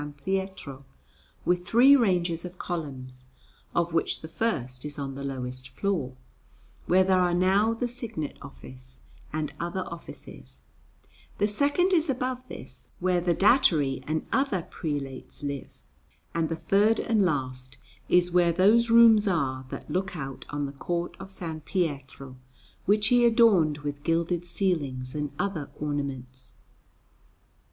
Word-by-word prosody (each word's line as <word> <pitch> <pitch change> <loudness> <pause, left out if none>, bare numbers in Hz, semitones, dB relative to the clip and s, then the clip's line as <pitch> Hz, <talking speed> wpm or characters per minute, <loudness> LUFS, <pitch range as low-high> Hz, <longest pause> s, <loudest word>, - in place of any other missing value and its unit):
Pietro, 190 -8 -3 0.6
with 180 0 +1
three 245 +9 +6
ranges 175 -9 +1
of 180 0 -8
columns, 130 -8 -6 0.5
of 170 -1 +1
which 165 - 0
the 160 - -7
first 130 - -2
is 150 0 -6
on 140 -1 -4
the 140 +1 -7
lowest 130 -1 -4
floor, 165 -10 -2 0.7
where 185 +2 +5
there 185 0 +3
are 175 -1 +2
now 195 +5 +3
the 240 +2 -1
Signet 230 - -5
Office 65 -1 -12 0.3
and 155 -1 -3
other 175 +2 -2
offices; 170 - -10 0.8
the 205 - +2
second 290 - +2
is 330 -3 +3
above 255 -1 -1
this, - - -9
where 180 -1 +1
the 175 -1 +1
Datary 160 - +3
and 155 +1 -1
other 265 -10 +1
prelates 145 -5 -6
live; 140 -1 -5 0.6
and 165 -2 0
the 165 - -1
third 200 +7 +3
and 225 -3 +1
last 130 -6 -2 0.3
is 180 0 +4
where 175 -1 +4
those 210 +7 +4
rooms 225 -2 +7
are 130 -8 -1
that - - -7
look 185 -1 -2
out 135 -2 -6
on 145 0 -2
the 140 - -5
court 170 +5 -3
of 195 - -8
S. 165 -5 -4
Pietro, 140 -7 -3 0.5
which 210 +2 +3
he 245 -1 +5
adorned 220 -11 +5
with 145 0 -4
gilded 170 +2 0
ceilings 145 -9 -1
and 150 -2 -3
other 160 -6 -2
ornaments. 135 -4 -5
170 Hz, 140 wpm, -27 LUFS, 140-195 Hz, 0.8 s, rooms